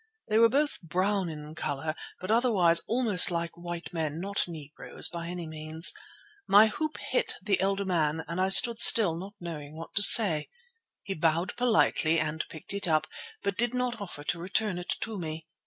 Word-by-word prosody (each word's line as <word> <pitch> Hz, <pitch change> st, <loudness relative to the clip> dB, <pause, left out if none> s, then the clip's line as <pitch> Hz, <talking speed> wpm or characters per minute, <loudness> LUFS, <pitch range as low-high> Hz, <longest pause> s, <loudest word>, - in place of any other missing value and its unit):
They 215 Hz, +1 st, +2 dB
were 230 Hz, 0 st, +5 dB
both 290 Hz, +4 st, -1 dB
brown 185 Hz, +3 st, -2 dB
in 150 Hz, -1 st, -9 dB
colour, 155 Hz, 0 st, -4 dB, 0.3 s
but 185 Hz, +3 st, -5 dB
otherwise 200 Hz, -8 st, +2 dB
almost 225 Hz, -6 st, +4 dB
like 170 Hz, -1 st, -4 dB
white 175 Hz, 0 st, -8 dB
men; 160 Hz, -2 st, -4 dB
not 200 Hz, +1 st, -3 dB
Negroes 155 Hz, -4 st, -5 dB
by 170 Hz, -1 st, -7 dB
any 175 Hz, -1 st, -6 dB
means. 155 Hz, +1 st, -1 dB, 0.5 s
My 205 Hz, +2 st, +6 dB
hoop 310 Hz, +7 st, -5 dB
hit -, -, -3 dB
the 200 Hz, -3 st, -1 dB
elder 195 Hz, +1 st, -1 dB
man, 160 Hz, -4 st, -1 dB
and 170 Hz, +2 st, -4 dB
I 190 Hz, -, +1 dB
stood 230 Hz, +4 st, +6 dB
still, 210 Hz, -8 st, +7 dB
not 195 Hz, +5 st, -9 dB
knowing 155 Hz, -4 st, -9 dB
what 165 Hz, -, -10 dB
to 200 Hz, -, +1 dB
say. 195 Hz, -7 st, +7 dB, 0.5 s
He 195 Hz, -, -5 dB
bowed 165 Hz, +2 st, -1 dB
politely 215 Hz, -9 st, +1 dB
and 155 Hz, 0 st, -2 dB
picked 160 Hz, +4 st, -10 dB
it 200 Hz, -2 st, -1 dB
up, 155 Hz, -2 st, +1 dB, 0.4 s
but 200 Hz, -2 st, -3 dB
did 240 Hz, +1 st, 0 dB
not 250 Hz, -3 st, -3 dB
offer 175 Hz, -7 st, -8 dB
to 170 Hz, -, -3 dB
return 190 Hz, +1 st, -2 dB
it 180 Hz, -, -10 dB
to 220 Hz, -3 st, -5 dB
me. 160 Hz, -1 st, -7 dB
180 Hz, 185 wpm, -27 LUFS, 160-205 Hz, 0.5 s, still